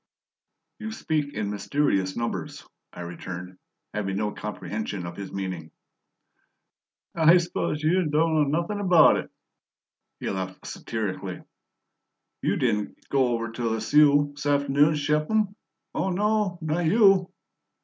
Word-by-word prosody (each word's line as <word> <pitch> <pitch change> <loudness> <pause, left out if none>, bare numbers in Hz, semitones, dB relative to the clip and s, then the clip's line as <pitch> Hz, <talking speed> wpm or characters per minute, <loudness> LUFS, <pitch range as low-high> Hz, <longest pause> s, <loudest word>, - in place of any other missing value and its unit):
"You 220 0 -5
speak 155 -9 -2
in 105 -1 -2
mysterious 100 -4 0
numbers," 115 0 -4 0.3
I 90 - -9
returned, 90 +1 -7 0.3
having 95 -2 -2
no 105 0 -1
comprehension 105 -3 -5
of 85 0 -7
his 100 0 -7
meaning. 95 -5 -5 1.4
"I 165 +1 +6
suppose 170 -3 -2
you 170 +1 +2
don' 160 +2 +2
know 155 -1 +4 0.2
nothin' 205 +4 -4
about 180 -5 +6
it," - - -5 0.9
he - - -5
laughed 95 -1 -5
satirically. 95 -4 -4 1.0
"You - - +1
didn' 105 -4 0 0.2
go 135 -2 +3
over 115 -2 -2
to 115 0 -2
Lisieux 145 +6 +4
'saft'noon 145 +1 +3
to - - -1
ship 150 +1 +1
'em? 215 -2 +1 0.4
Oh, 180 +5 -1
no, 205 0 +1
not 160 +2 0
YOU!" 195 -1 +5
145 Hz, 130 wpm, -26 LUFS, 100-165 Hz, 1.4 s, I